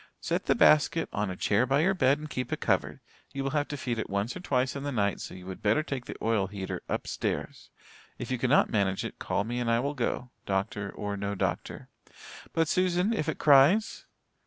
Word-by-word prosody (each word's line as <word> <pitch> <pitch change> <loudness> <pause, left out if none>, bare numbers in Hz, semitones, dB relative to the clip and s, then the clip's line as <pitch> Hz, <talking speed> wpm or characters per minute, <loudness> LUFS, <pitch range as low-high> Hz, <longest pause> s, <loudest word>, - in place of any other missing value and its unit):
"Set - - -2
the - - +4
basket 155 +2 +4
on 105 -1 -1
a 95 - -4
chair 105 +7 +2
by 135 +3 +3
your 190 +4 +3
bed 140 -6 +3
and 150 0 -8
keep 125 -1 -3
it - - -2
covered. - - 0 0.3
You 135 -1 -3
will 135 - -1
have 145 -1 0
to 145 - -5
feed 120 -3 -3
it - - -4
once 100 +4 -2
or - - -5
twice 130 -7 0
in 140 - -4
the 145 0 -3
night, 100 -6 0
so - - -7
you 90 -1 -11
would 95 0 -7
better 110 +9 +2
take 135 -4 -5
the - - -7
oil 110 -4 +1
heater 95 -1 -5
upstairs. - - -3 0.5
If 120 - -6
you 130 - -1
cannot 130 +4 +3
manage 100 -3 0
it - - -7
call 100 - -1
me 120 +3 -3
and 120 -1 -1
I 115 0 +3
will 140 +4 -1
go, 125 -1 -2 0.2
doctor 100 +1 -1
or 100 -1 -4
no 100 +1 -3
doctor." - - -3 0.6
"But, 165 -1 +1
Susan, 185 +4 +2
if 185 -9 -1
it - - -2
cries?" 150 +9 +4
125 Hz, 225 wpm, -28 LUFS, 105-145 Hz, 0.6 s, the